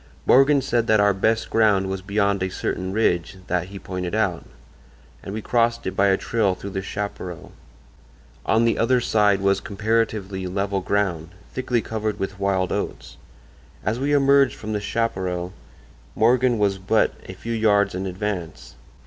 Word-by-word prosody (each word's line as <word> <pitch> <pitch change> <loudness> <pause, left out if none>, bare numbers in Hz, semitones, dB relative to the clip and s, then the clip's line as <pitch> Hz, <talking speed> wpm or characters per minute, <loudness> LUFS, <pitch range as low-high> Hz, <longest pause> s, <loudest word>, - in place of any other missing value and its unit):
Morgan 135 +1 +5
said 120 -2 0
that 110 -1 +4
our 100 0 +4
best 110 +4 0
ground 105 -4 +3
was 95 0 -3
beyond 100 0 0
a 95 - 0
certain 95 0 -3
ridge 95 -3 0
that 90 -1 -1
he 100 +1 -9
pointed 90 -2 -4
out, - - 0 0.8
and - - -7
we 105 +1 -5
crossed 115 -1 +1
it 95 - -3
by 100 +1 +3
a 95 -1 +3
trail 105 -5 0
through 100 +2 -8
the 95 0 -3
chaparral. 95 -3 -6 0.9
On 115 +1 +2
the 115 - +1
other 125 +2 +3
side 105 -4 +2
was 100 0 +2
comparatively 105 -3 -1
level 100 +1 -1
ground, 90 -5 -1 0.2
thickly 125 -3 -1
covered 110 -1 -3
with 95 0 -4
wild 95 -2 0
oats. - - -4 0.7
As 110 +3 0
we 140 +2 0
emerged 140 -3 +4
from 110 0 -6
the 105 - -2
chaparral 95 -5 -2 0.6
Morgan 120 +1 +3
was 100 -2 +1
but 100 +3 +2 0.2
a - - -5
few 115 +5 -5
yards 105 -3 +2
in 95 +1 -3
advance. 90 -3 -5
100 Hz, 165 wpm, -23 LUFS, 95-115 Hz, 0.9 s, Morgan